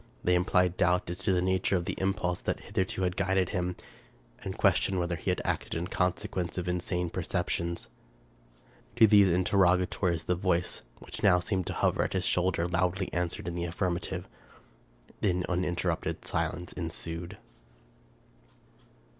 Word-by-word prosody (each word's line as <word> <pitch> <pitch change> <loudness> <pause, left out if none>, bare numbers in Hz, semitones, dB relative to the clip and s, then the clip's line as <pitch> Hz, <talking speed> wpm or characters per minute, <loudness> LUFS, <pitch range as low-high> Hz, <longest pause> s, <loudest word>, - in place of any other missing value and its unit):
They 90 - +3
implied 90 0 +2
doubt 90 0 +2
as 90 - -5
to 100 - +1
the 90 -1 +2
nature 95 +1 +1
of 85 -1 0
the 95 - -2
impulse 95 -2 0
that - - -2
hitherto 95 0 -2
had 90 0 0
guided 95 -2 +1
him, 90 0 -1 0.7
and - - -5
questioned 95 - +3
whether 85 -1 0
he 80 - -4
had - - 0
acted - - -2
in 85 +2 -3
consequence 90 -1 -1
of 90 -1 -2
insane 90 -1 -1
perceptions. 85 -1 -2 1.1
To 115 -1 +7
these 100 -3 +6
interrogatories 90 -1 +2
the 90 - +1
voice, 90 -1 0 0.2
which - - -9
now 95 -3 +5
seemed 95 0 -2
to - - -2
hover - - +1
at - - -3
his 95 -1 0
shoulder, 90 -1 +1
loudly 90 +2 0
answered 85 0 -2
in 85 - -2
the 85 0 -2
affirmative. 85 0 -2 0.9
Then 90 -3 +1
uninterrupted 90 -1 -1
silence 90 +2 -2
ensued. 85 +2 -4
90 Hz, 150 wpm, -29 LUFS, 85-95 Hz, 1.1 s, To